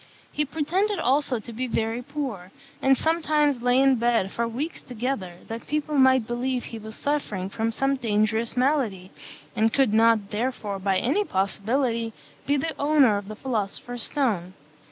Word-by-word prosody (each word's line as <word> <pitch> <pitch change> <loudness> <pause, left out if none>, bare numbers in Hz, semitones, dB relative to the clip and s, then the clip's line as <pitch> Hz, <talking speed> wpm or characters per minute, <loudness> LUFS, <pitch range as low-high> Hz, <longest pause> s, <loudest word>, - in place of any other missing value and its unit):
He 300 - 0
pretended 350 +8 0
also 270 -4 +1
to 230 +2 -9
be 255 +3 -3
very 225 0 -1
poor; 250 -10 -5 0.3
and 270 0 +4
sometimes 305 -4 +1
lay 245 +1 +3
in 270 -1 +5
bed 230 -4 +1
for 235 0 -1
weeks 275 +9 -4
together, 230 -7 -4
that 230 +1 -7
people 300 0 -2
might 260 -3 +5
believe 245 +2 -2
he 225 - -7
was 220 +1 -8
suffering 210 -10 -2
from 225 +1 -1
some 270 +4 0
dangerous 220 0 0
malady, 245 -9 0 0.4
and 225 0 +3
could 265 -5 +2
not 225 -2 +4
therefore, 210 -3 -2
by 190 0 +1
any 290 - +1
possibility, 230 - -1 0.3
be 285 +1 +3
the 320 +3 -2
owner 285 -7 +4
of 200 -1 -6
the 215 - -7
philosopher's 240 0 -3
stone. 200 -12 0
240 Hz, 160 wpm, -25 LUFS, 220-275 Hz, 0.4 s, in